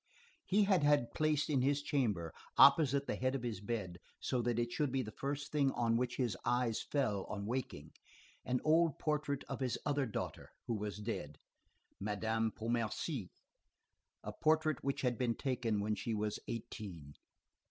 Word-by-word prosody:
He 205 +2 +4
had 195 -4 +3
had 145 -4 +3
placed 155 -1 +2
in 140 -4 +2
his 140 +2 +2
chamber, 105 - 0 0.2
opposite 140 -1 +7
the - - -2
head 130 +1 0
of 130 - -3
his 115 -5 -3
bed, 100 -5 -3 0.2
so 125 - 0
that 120 -1 0
it 120 0 0
should 145 +2 0
be 135 0 0
the 110 - -7
first 140 +3 -4
thing 140 -3 +3
on 115 -1 +1
which 125 +1 0
his 120 -6 0
eyes 120 -2 +1
fell 110 -9 0
on 100 -1 -5
waking, 110 - -4 0.5
an 125 0 0
old 160 -1 +4
portrait 150 -2 -1
of - - -4
his 130 -3 0
other 145 -2 +1
daughter, 110 - -5 0.2
who 120 - -1
was 105 -2 -3
dead, 95 -9 -4 0.6
Madame 110 +2 0
Pontmercy, 115 - -2 0.9
a - - -4
portrait 155 -2 +2
which 140 0 -1
had 125 -3 0
been 120 -2 +1
taken 125 -6 -1
when 105 +1 0
she 105 +2 -2
was 105 0 -1
eighteen. 100 -10 -6
120 Hz, 170 wpm, -35 LUFS, 110-140 Hz, 0.9 s, opposite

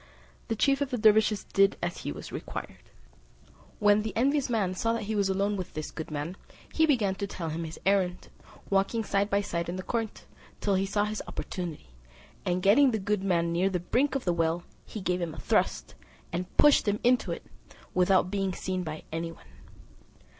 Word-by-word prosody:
The 225 - -1
chief 275 +5 +2
of 285 - 0
the 250 - -1
dervises 215 -1 +4
did 195 0 +3
as 175 0 -3
he - - -4
was 75 +1 -8
required. - - -6 1.0
When 205 0 +4
the 220 +1 -4
envious 275 +2 +2
man 205 -6 +1
saw 230 +5 0
that 230 -1 -2
he 215 +2 -3
was 200 -2 +1
alone 200 +2 +1
with 185 - -6
this 155 0 -4
good 160 - -6
man, 155 +5 -4 0.4
he 320 0 +4
began 225 -10 +2
to 200 +1 -4
tell 170 -4 -5
him 165 +2 -3
his 160 - -8
errand, 190 -2 +1 0.4
walking 195 +4 +2
side 200 0 +1
by 200 0 +2
side 170 -3 -3
in 175 - -3
the 185 - -5
court, 225 -1 -3 0.3
till 200 - +1
he 195 +1 +1
saw 205 +1 +1
his 215 0 -3
opportunity; 170 - -5 0.6
and 180 0 0
getting 250 +8 +6
the 225 - 0
good 205 0 -1
man 170 -3 +1
near 180 +3 +2
the 180 -2 -1
brink 255 - +1
of 270 - -2
the 175 - +2
well, 165 +1 0 0.2
he 215 - -6
gave 180 -1 0
him 165 -2 -3
a - - -8
thrust, - - 0 0.4
and 180 +2 -4
pushed 295 -6 +6
him 205 +1 +1
into 245 +1 +3
it, - - -5 0.5
without 185 0 +3
being 195 -2 0
seen 185 +1 -3
by 155 -2 -6
any 165 +1 -3
one. 165 - -16
195 Hz, 205 wpm, -28 LUFS, 175-215 Hz, 1.0 s, getting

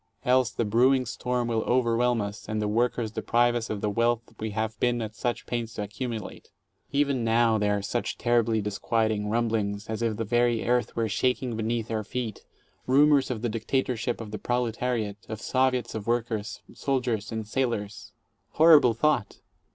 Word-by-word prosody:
Else 125 -1 +4
the 115 - -2
brewing 125 +5 +3
storm 125 0 -2
will 115 -1 0
overwhelm 120 -1 +2
us, 100 +1 -6
and 110 0 -1
the 105 - 0
workers 115 0 0
deprive 120 +2 +2
us 120 -2 -3
of 105 -2 -3
the 105 - 0
wealth 115 +1 0
we 110 - -3
have 110 +1 -3
been 120 -1 +1
at 110 -2 -4
such 120 +2 -3
pains 115 -1 -4
to 105 - -3
accumulate. 110 +1 -6 0.4
Even 140 -3 +1
now 115 -1 +3
there 105 0 +1
are - - -3
such 120 +4 -2
terribly 115 -2 +2
disquieting 105 +1 -1
rumblings, 110 -3 -1
as 110 +1 -4
if 115 -2 0
the 115 - -1
very 120 0 +1
earth 120 -1 +1
were 115 -1 0
shaking 125 +2 0
beneath 115 +1 -2
our 110 -1 -1
feet 115 -1 -5 0.2
— - - -39
rumors 140 +1 +4
of 120 -3 -4
"the 120 - +1
dictatorship 120 +1 -1
of 110 -2 -7
the 105 - -5
proletariat," 120 -3 -1
of 110 -1 -5
"Soviets 130 -1 0
of 110 -1 -5
workers, 115 -3 -2
soldiers 125 -6 -1
and 110 -2 -4
sailors." 110 -4 -2 0.4
Horrible 155 -7 +6
thought! 125 -4 0
115 Hz, 175 wpm, -27 LUFS, 110-125 Hz, 0.4 s, Horrible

